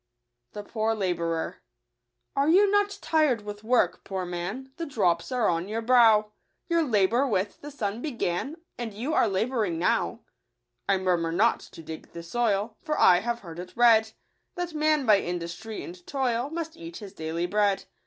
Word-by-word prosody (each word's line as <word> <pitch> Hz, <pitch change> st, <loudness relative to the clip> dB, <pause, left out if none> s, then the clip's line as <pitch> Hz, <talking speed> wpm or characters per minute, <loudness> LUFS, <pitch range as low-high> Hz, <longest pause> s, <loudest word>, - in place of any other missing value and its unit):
@5* 205 Hz, 0 st, -6 dB
ipoor 225 Hz, 0 st, -1 dB
Xaiioum* 170 Hz, -4 st, -1 dB, 0.4 s
" -, -, -54 dB
Are 280 Hz, +2 st, +2 dB
you 395 Hz, +4 st, +5 dB
not 410 Hz, 0 st, +2 dB
tir'd 305 Hz, -8 st, +2 dB
with 205 Hz, 0 st, -8 dB
work, 240 Hz, +2 st, +2 dB
poor 190 Hz, -2 st, -4 dB
man; 180 Hz, +10 st, -5 dB
The 335 Hz, 0 st, -4 dB
drops 185 Hz, -8 st, 0 dB
are 245 Hz, -4 st, +1 dB
on 170 Hz, +1 st, 0 dB
your 225 Hz, +2 st, -3 dB
brow; 225 Hz, -3 st, +5 dB, 0.4 s
Your 335 Hz, -1 st, +2 dB
labour 235 Hz, -1 st, +2 dB
with 200 Hz, -4 st, -1 dB
the 290 Hz, -, -7 dB
sun 220 Hz, -5 st, -3 dB
began, 250 Hz, -, -2 dB, 0.2 s
And 225 Hz, -4 st, -5 dB
you 255 Hz, +9 st, -3 dB
are 235 Hz, -, +4 dB
labouring 210 Hz, -2 st, 0 dB
now 170 Hz, -, 0 dB, 0.2 s
?" 120 Hz, 0 st, -54 dB
" 120 Hz, +5 st, -25 dB
I 195 Hz, -, +4 dB
murmur 175 Hz, -3 st, 0 dB
not 215 Hz, +7 st, +3 dB
to 165 Hz, -, -12 dB
dig 160 Hz, 0 st, -9 dB
the 170 Hz, -, -7 dB
soil, 215 Hz, +2 st, 0 dB
For 300 Hz, -, -2 dB
I 180 Hz, -, +7 dB
have 235 Hz, +3 st, -3 dB
heard 170 Hz, -2 st, -9 dB
it 180 Hz, +4 st, -9 dB
read, 220 Hz, -2 st, +5 dB, 0.4 s
That 355 Hz, -1 st, -4 dB
man 305 Hz, -2 st, +2 dB
by 210 Hz, -3 st, +6 dB
industry 175 Hz, +5 st, -5 dB
and 175 Hz, 0 st, -11 dB
toil 255 Hz, -2 st, -1 dB
Must 330 Hz, 0 st, -5 dB
eat 335 Hz, 0 st, -9 dB
his 205 Hz, -3 st, -10 dB
daily 160 Hz, 0 st, -3 dB
bread. 205 Hz, +1 st, +1 dB
215 Hz, 185 wpm, -27 LUFS, 180-260 Hz, 0.4 s, I